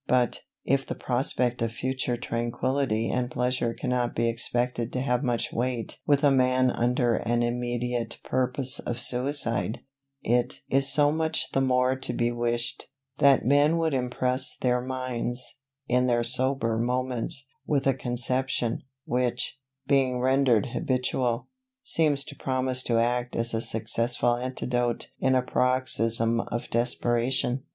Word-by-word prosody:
But, 125 -2 +2 0.3
if 135 +1 +2
the - - -5
prospect 125 -1 0
of 115 -1 0
future 130 0 -2
tranquillity 120 0 -1
and 125 -1 -1
pleasure 125 -2 -1
cannot 125 -1 -1
be 115 +1 +1
expected 120 0 -1
to 125 - -1
have 125 -2 0
much 120 -4 -1
weight 120 -1 -2
with 145 -1 +3
a 145 - +5
man 130 -1 +3
under 120 -1 +1
an 120 0 0
immediate 120 -1 -2
purpose 130 +1 0
of 120 0 -4
suicide, 125 -5 0 0.4
it 120 +1 0
is 135 +1 +4
so 145 0 +4
much 160 0 0
the 135 - +1
more 130 0 +2
to 130 -2 -5
be 120 0 0
wished, 120 0 -1 0.3
that 140 -1 +5
men 145 +5 +4
would 165 -2 0
impress 125 +1 -1
their 125 -1 +1
minds, 130 0 -4 0.3
in 125 +1 +2
their 120 -1 +2
sober 125 -2 +2
moments, 125 +2 -1 0.2
with 140 -2 +1
a 135 - +4
conception, 125 0 -1 0.2
which, 125 +1 -1 0.3
being 130 -3 +2
rendered 130 -4 +3
habitual, 125 -1 -1 0.4
seems 150 -4 +1
to 140 - -10
promise 130 -1 -1
to 120 -2 0
act 120 +1 0
as 115 0 -1
a 115 - 0
successful 115 +2 +1
antidote 120 -1 -2
in 130 0 +2
a 130 - +2
paroxysm 115 -3 +2
of 120 - -4
desperation. 120 +2 0
125 Hz, 140 wpm, -27 LUFS, 120-130 Hz, 0.4 s, a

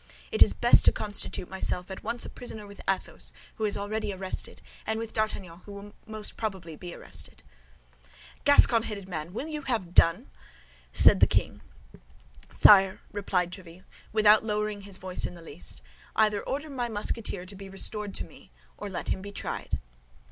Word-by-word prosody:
It - - -1
is - - +9
best - - +6
to - - +8
constitute 205 -3 -1
myself 190 -1 -3
at 190 - -6
once 240 - 0
a - - -6
prisoner 220 -4 -6
with 200 0 -11
Athos, 195 - -2 0.2
who 220 - 0
is 210 - 0
already 205 +1 -2
arrested, 190 -1 -4 0.3
and 220 0 0
with 225 0 -5
D'Artagnan, 195 -6 -2
who 205 0 -9
most 215 -1 -5
probably 190 -7 -4
will 155 - -11
be." 175 -1 -7 1.5
"Gascon 275 -5 +6
headed 205 -4 -6
man, 165 -2 -5
will 245 +10 -4
you 305 -1 -4
have 225 -10 -2
done?" 175 +11 +4 0.6
said - - +6
the - - +7
king. - - 0 0.9
"Sire," 195 -2 +7
replied 185 -3 0
Tréville, 180 -1 -11 0.3
without 215 0 +6
lowering 210 -1 -1
his 200 -1 -6
voice 185 -1 -3
in - - -9
the 170 - -11
least, 145 - -8 0.3
"either 210 -2 +3
order 285 +3 -3
my 245 -3 -2
Musketeer 205 -3 -2
to 195 +2 -7
be 195 0 -9
restored 205 +1 -1
to - - 0
me, - - -15 0.3
or 205 - -5
let 190 - -4
him 190 - 0
be 200 +1 -7
tried." - - -3
205 Hz, 170 wpm, -28 LUFS, 185-215 Hz, 1.5 s, is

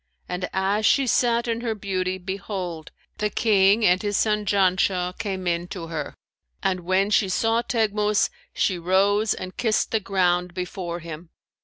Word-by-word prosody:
And 180 0 -3
as 195 +3 0
she 275 - +4
sat 235 -1 +2
in 230 0 -1
her 230 -2 -2
beauty, 185 -2 -2
behold, 185 -3 -5 0.3
the 210 - +1
King 205 0 +3
and 180 0 +4
his 205 -1 -1
son 210 -1 +1
Janshah 185 -2 +2
came 190 -3 -3
in 175 0 -1
to 170 -3 -7
her, 155 -3 -5 0.5
and 185 -1 +1
when 190 +3 +1
she 200 -2 +3
saw 225 +4 +1
Teghmus, 210 -3 +1 0.2
she 185 -3 0
rose 200 +4 +2
and 185 0 -7
kissed 220 -3 +1
the 220 - +2
ground 180 -3 0
before 180 -1 -4
him. 165 +1 -9
190 Hz, 160 wpm, -24 LUFS, 180-210 Hz, 0.5 s, she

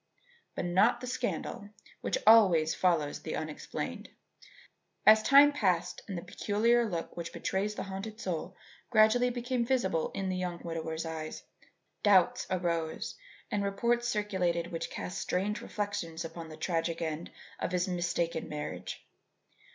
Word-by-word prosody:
But - - -2
not 195 +8 +4
the 250 - -6
scandal 245 -4 -3 0.3
which - - 0
always 180 -8 +6
follows 165 -5 +1
the - - -4
unexplained. 155 -1 -5 1.0
As 215 0 +8
time 280 +5 +7
passed 180 -8 0
and 195 -4 -4
the 170 - -5
peculiar 225 +5 +2
look 170 -3 -4
which 170 -1 -5
betrays 205 +2 -2
the - - -3
haunted 195 +3 -6
soul 180 -1 -4 0.3
gradually 235 +2 +5
became 245 0 -1
visible 230 -10 +1
in 195 -1 -2
the 185 - -1
young 180 -1 -3
widower's 165 -1 -4
eyes, 160 -1 -5 0.6
doubts 195 -4 +4
arose 170 -3 -1 0.4
and 205 -1 0
reports 235 +5 +1
circulated 185 -6 0
which 165 -1 -3
cast 180 - -5
strange 200 +3 -1
reflections 205 -6 -3
upon 165 0 -7
the 155 - -10
tragic 165 0 -1
end 160 0 -3 0.3
of - - -2
his 180 0 +1
mistaken 170 -2 -1
marriage. 150 0 -6
185 Hz, 140 wpm, -31 LUFS, 165-215 Hz, 1.0 s, As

